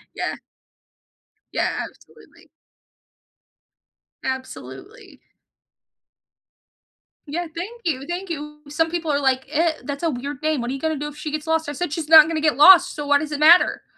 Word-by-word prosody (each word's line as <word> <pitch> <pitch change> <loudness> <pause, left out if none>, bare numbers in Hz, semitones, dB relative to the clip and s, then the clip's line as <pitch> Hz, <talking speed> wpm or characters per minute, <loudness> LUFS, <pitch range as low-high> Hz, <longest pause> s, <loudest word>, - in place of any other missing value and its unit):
Yeah. - - -3 1.2
Yeah, - - 0 0.2
absolutely. - - -21 1.8
Absolutely. 260 0 -8 2.1
Yeah, 340 +4 -4
thank 435 +8 -7
you, 275 -5 -2
thank 360 +2 -5
you. 300 -2 -7
Some 325 +3 -1
people 335 -2 -3
are, 285 - +1
like, 265 -1 0
"Eh 320 +2 +1
that's 285 +2 -6
a 330 - +1
weird 280 +1 -6
name. 310 -2 0
What 240 +1 -4
are 270 - -4
gonna 315 +2 -2
do 295 +2 -5
if 295 - -10
she 300 0 -6
gets 305 +1 -5
lost?" 320 -1 0
I - - -3
said, 300 +1 -4
"She's 310 -1 -5
not 315 -1 +9
gonna 320 -1 -3
get 305 -5 +1
lost, 355 +4 +7
so 295 -1 -6
why 285 0 +4
does 300 0 -6
it 295 - -4
matter?" 330 +4 +5
305 Hz, 165 wpm, -21 LUFS, 285-330 Hz, 2.1 s, not